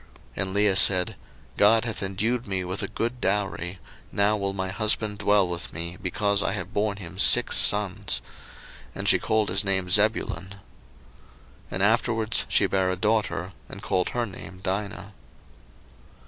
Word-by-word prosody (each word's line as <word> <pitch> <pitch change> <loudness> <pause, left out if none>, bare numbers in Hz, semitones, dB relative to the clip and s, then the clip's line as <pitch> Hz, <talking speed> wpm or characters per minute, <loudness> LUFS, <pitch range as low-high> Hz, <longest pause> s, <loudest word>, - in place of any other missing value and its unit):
01:030:020 - - -26 0.3
And 95 0 -3
Leah 100 -1 +3
said, 95 -2 +3 0.4
God 110 +3 +4
hath 115 -3 -4
endued 110 +5 -2
me 95 -2 -2
with 90 +2 -3
a - - -2
good 120 +2 -4
dowry; 95 -2 -2 0.3
now 100 +1 +2
will 100 -2 -2
my 95 -1 -4
husband 105 0 0
dwell 105 -2 +3
with 85 -1 -5
me, 85 +1 -5
because 100 +2 0
I 95 - -1
have 105 - -6
born 105 -1 -1
him 95 -1 -9
six 120 +3 +6
sons: 105 -3 +3 0.8
and - - -4
she - - +4
called 110 -1 0
his 100 +3 +2
name 95 -2 -1
Zebulun. 95 -3 +1
01:030:021 - - -17 1.1
And 95 - -2
afterwards 110 +1 +1
she - - +3
bare 95 -1 0
a 95 - -1
daughter, 105 -2 -1 0.2
and - - -10
called 90 -1 0
her 120 -1 -2
name 95 -2 -10
Dinah. 100 0 -4
100 Hz, 160 wpm, -25 LUFS, 95-105 Hz, 1.1 s, six